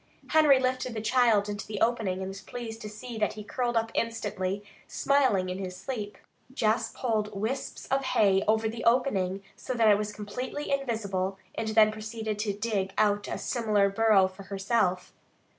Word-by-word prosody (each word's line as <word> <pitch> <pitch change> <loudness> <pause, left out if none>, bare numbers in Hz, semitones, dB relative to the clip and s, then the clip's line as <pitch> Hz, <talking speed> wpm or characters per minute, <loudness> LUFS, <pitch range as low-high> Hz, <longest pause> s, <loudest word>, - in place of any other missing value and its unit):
Henry 305 -3 +6
lifted 255 -2 -1
the - - -2
child 220 -3 +3
into 205 0 -5
the 210 -2 -4
opening 225 -5 +1
and 190 - -3
was 195 +1 -8
pleased 225 +2 -7
to 210 - -6
see 220 +2 -8
that 210 - +1
he 210 - -8
curled 240 +2 -1
up 225 0 0
instantly, 205 -4 -2 0.2
smiling 260 -10 +2
in 185 +1 -4
his 185 -2 -5
sleep. 210 0 -5 0.3
Jess 225 -3 +1
pulled 215 -4 -1
wisps 245 +6 -3
of 270 0 +1
hay 200 -6 +3
over 220 +1 +3
the 225 +1 -5
opening 200 -6 +1
so 255 - -5
that 230 -2 +4
it 205 0 +5
was 210 0 -5
absolutely 250 +8 -4
invisible, 200 -8 -1 0.2
and 225 - -3
then 215 0 +5
proceeded 215 0 -5
to 210 -1 0
dig 200 -2 -2
out 205 -1 +2
a - - -3
similar 210 -4 +1
burrow 200 -2 +4
for 190 +1 -12
herself. 195 -1 -1
215 Hz, 175 wpm, -28 LUFS, 200-235 Hz, 0.3 s, Henry